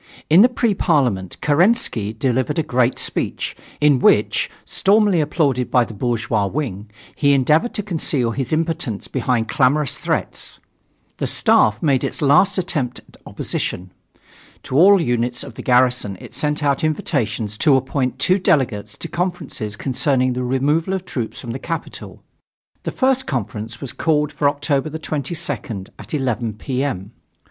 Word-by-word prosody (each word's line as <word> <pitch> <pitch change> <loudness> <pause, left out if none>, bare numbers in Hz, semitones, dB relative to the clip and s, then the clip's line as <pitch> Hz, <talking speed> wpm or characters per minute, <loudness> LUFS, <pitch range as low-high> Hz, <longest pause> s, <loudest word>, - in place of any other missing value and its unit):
In 170 +5 +8
the 245 - +7
Pre 240 -3 +1
Parliament 125 - 0
Kerensky 155 - +2
delivered 130 +5 -1
a 160 - +2
great 125 -2 +1
speech, - - -2 0.2
in 145 -3 +4
which, - - +3 0.2
stormily 200 -3 +3
applauded 140 -5 0
by 125 -2 +3
the 115 - -10
bourgeois 115 -2 -1
wing, 105 -5 -4 0.3
he 140 -1 +3
endeavored 150 - +2
to 210 - -2
conceal 150 - 0
his 130 +1 -3
impotence 160 -9 -2
behind 120 -4 -1
clamorous 140 +2 +1
threats. - - -2 0.6
The - - -2
Staff 105 +5 +3
made 140 -5 +2
its - - -3
last 150 +8 +4
attempt 150 -9 -2
at - - -19
opposition. 90 0 -4 0.7
To - - -5
all 195 +6 +7
units 120 -4 -1
of 135 - -9
the - - -8
garrison 125 -5 +2
it - - -12
sent 150 +4 -1
out 140 0 +1
invitations 115 -8 -1
to 150 -4 +5
appoint 130 -1 -1
two 185 +8 +2
delegates 130 - 0
to - - -5
conferences 165 - -3
concerning 130 +1 0
the 125 +1 -3
removal 145 +8 +1
of 185 -1 -5
troops 120 -9 -4
from 120 - -6
the 130 - -5
capital. 165 +2 -6 0.6
The - - -4
first 260 0 +1
conference 115 -3 -4
was 135 - -6
called 150 -2 +1
for 145 -1 +2
October 145 0 -1
22nd, 145 - -4
at - - -6
11 125 -5 -1
P. 130 +5 -3
M. 100 -7 -4
135 Hz, 155 wpm, -20 LUFS, 120-155 Hz, 0.7 s, In